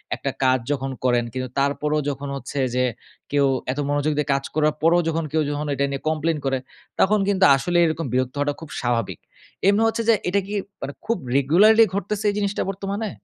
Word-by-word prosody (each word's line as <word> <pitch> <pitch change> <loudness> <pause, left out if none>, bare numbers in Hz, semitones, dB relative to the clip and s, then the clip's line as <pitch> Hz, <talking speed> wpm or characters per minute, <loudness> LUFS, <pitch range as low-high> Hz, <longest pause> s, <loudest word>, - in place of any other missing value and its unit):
একটা - - -3
কাজ 130 0 +4
যখন 135 -1 -2
করেন, 120 -2 +2
কিন্তু 130 -1 -4
তারপরেও 150 +2 0
যখন 140 0 -5
হচ্ছে 135 +1 -5 0.2
যে 125 - +2 0.5
কেউ 140 -1 +3 0.3
এত 135 - -4
মনোযোগ 145 +1 +1
দিয়ে 150 - 0
কাজ 135 0 -1
করার 155 -1 +2
পরেও 170 +2 +4
যখন 165 0 -1
কেউ 160 - +1
যখন 150 +1 -3
এটা 140 +1 0
নিয়ে 135 - -4
কমপ্লেইন 160 0 0
করে, 135 0 +1 0.4
তখন 210 +2 +4
কিন্তু 195 -1 +3
আসলে 175 +6 -1
এইরকম 160 -1 0
বিরক্ত 130 +1 0
হওয়াটা 145 0 0
খুব 160 - -9
স্বাভাবিক। 120 -3 -1 0.5
এমনি 205 +2 +4
হচ্ছে 225 +1 -1
যে - - +8 0.2
এটা 200 +2 +2
কি 205 - -6 0.3
মানে 140 +1 -5
খুব 230 -1 0 0.2
রেগুলারলি 205 - +6
ঘটতেছে 200 +2 -2
এই - - -7
জিনিসটা 200 0 -1
বর্তমানে? 200 +3 -4
150 Hz, 195 wpm, -23 LUFS, 135-195 Hz, 0.5 s, যে